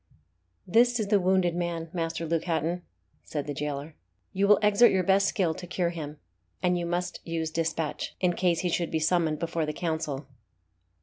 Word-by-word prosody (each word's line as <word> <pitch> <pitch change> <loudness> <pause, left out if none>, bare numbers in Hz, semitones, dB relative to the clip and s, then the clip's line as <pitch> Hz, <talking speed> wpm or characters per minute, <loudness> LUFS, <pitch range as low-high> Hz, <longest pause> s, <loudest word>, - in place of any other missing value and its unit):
"This 240 +5 +4
is 210 -2 -1
the 205 -1 +4
wounded 185 -1 +2
man, 170 -2 -3
Master 165 -1 -2
Luke 165 0 -1
Hatton," 165 +1 -1 0.4
said 145 -2 -4
the 145 - -3
jailer; 145 +1 -4 0.4
"you 195 +1 +2
will 210 0 +7
exert 210 +3 +6
your 190 -1 +2
best 195 +2 +4
skill 175 -4 +1
to 180 +2 -9
cure 175 -1 0
him; 155 -3 -6 0.5
and 180 0 +3
you 175 -1 -2
must 180 +1 -2
use 165 -1 -3
dispatch, 165 -1 -2
in 180 -1 +2
case 175 -2 +1
he 180 - 0
should 170 0 0
be 160 - 0
summoned 160 -1 +1
before 165 -1 -2
the 150 - -2
Council." 155 -4 -3
170 Hz, 185 wpm, -28 LUFS, 160-180 Hz, 0.5 s, will